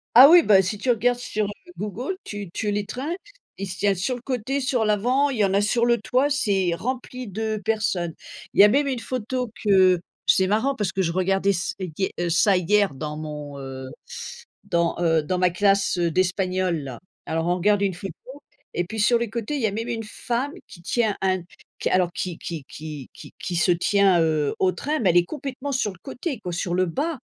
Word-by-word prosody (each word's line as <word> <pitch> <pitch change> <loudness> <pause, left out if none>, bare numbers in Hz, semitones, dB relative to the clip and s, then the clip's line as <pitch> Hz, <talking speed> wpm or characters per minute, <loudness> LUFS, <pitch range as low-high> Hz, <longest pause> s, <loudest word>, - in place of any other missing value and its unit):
Ah 265 +4 +11
oui, 345 0 +9
bah 195 -2 +6
si 200 +3 -3
tu 250 +5 -3
regardes 245 +1 +3
sur, 215 -3 -2
heu, - - -4 0.3
Google, 220 - -4
tu 205 -3 -6
tu 210 +2 -2
les 205 0 -1
trains, 270 - -4 0.4
ils 195 0 -4
se 185 - -6
tiennent 200 -1 +2
sur 230 +8 -1
le 240 - -9
côté, 265 +2 -2
sur 255 -3 +1
l'avant, 250 +7 +2
y 225 -6 +1
en 190 - 0
a 200 - +3
sur 235 +3 +2
le 235 -2 +3
toit, 255 +4 +2
c'est 195 -10 +1
rempli 250 +2 -4
de 215 +2 -2
personnes. 195 -7 0 0.4
Il - - -3
y - - +10
a - - +9
même 280 +6 +2
une 255 -3 -1
photo 250 -1 -3
que 185 -3 +5 0.3
c'est 190 0 +4
marrant 225 +7 +1
parce 205 -6 -1
que 190 - -1
je 170 -2 0
regardais 195 +2 +1
s 175 -2 -2
hie 185 +1 -2
heu, 175 -1 0
ça, 185 +3 +4
hier 200 -1 +2
dans 150 +2 -5
mon, 150 -2 -6
heu, 130 -1 -7 0.8
dans, 170 -3 0
heu, 165 -2 +3
dans 180 +4 -1
ma 180 -1 +3
classe, 195 0 +2
heu, 170 -1 +1
d'espagnol 185 0 0
là. 130 -3 -7 0.3
Alors 165 +1 -1
on 180 - +2
regarde 205 +2 +2
une 195 -3 +1
photo 190 +2 -7 0.6
et 175 - +1
puis 220 +5 -7
sur 235 +3 +4
les 235 -2 -3
côtés, 235 +6 -3
y 225 - +2
a - - 0
même 225 +3 -3
une 230 -1 -2
femme 245 +6 -3
qui 170 - -14
tient 220 +1 +1
un 185 -2 +1 0.4
qui - - -1
alors, 180 -1 +2
qui 175 -1 -4
qui 160 -5 -6
qui 150 -4 -8
qui - - -12
qui 180 - -4
se 175 - +3
tient, 190 0 +3
heu, 155 -3 +1
au 185 -1 +3
train. 305 +2 -2
Mais 190 -6 +3
elle 175 - +2
est 175 - +4
complètement 280 -1 -5
sur 220 -6 0
le 180 - -17
côté 270 -2 -5
quoi, 180 -4 -5
sur 175 0 -2
le 185 0 +2
bas, 290 - -2
200 Hz, 220 wpm, -24 LUFS, 175-240 Hz, 0.8 s, Ah